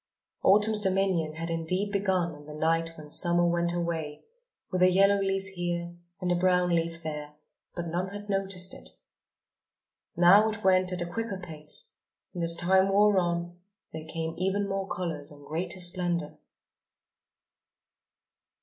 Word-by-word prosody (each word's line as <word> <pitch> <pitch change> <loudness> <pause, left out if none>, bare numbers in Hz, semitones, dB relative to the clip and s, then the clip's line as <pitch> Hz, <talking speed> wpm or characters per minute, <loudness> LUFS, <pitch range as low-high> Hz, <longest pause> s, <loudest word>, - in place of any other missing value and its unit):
Autumn's 210 +2 +4
dominion 190 -5 +1
had 165 +1 -5
indeed 180 +5 -1
begun 190 -4 0
on 145 0 -14
the 150 - -8
night 165 +1 0
when 150 -1 -11
Summer 175 +1 +2
went 170 0 +1
away, 165 -4 -3 0.5
with 185 - -1
a 185 - +7
yellow 195 +2 +4
leaf 195 0 -1
here 175 -2 -4 0.2
and 180 -2 -1
a - - +3
brown 180 0 +2
leaf 165 0 -1
there, 150 -1 -6 0.4
but 175 - -4
none 175 +3 -2
had 205 +1 -8
noticed 195 -2 0
it. - - -9 1.3
Now 195 +5 +6
it 220 0 -6
went 185 -1 +3
at 180 -1 -2
a - - -4
quicker 200 +3 -4
pace; 155 -4 -5 0.4
and 175 - -5
as 170 0 +5
time 190 +3 +3
wore 205 0 +4
on, 175 0 -2 0.3
there 160 0 -7
came 160 0 -4
even 195 +2 0
more 195 0 -3
colours 165 -6 -3
and 145 -1 -14
greater 170 +5 -4
splendour. 175 -3 0
175 Hz, 150 wpm, -28 LUFS, 165-190 Hz, 1.3 s, a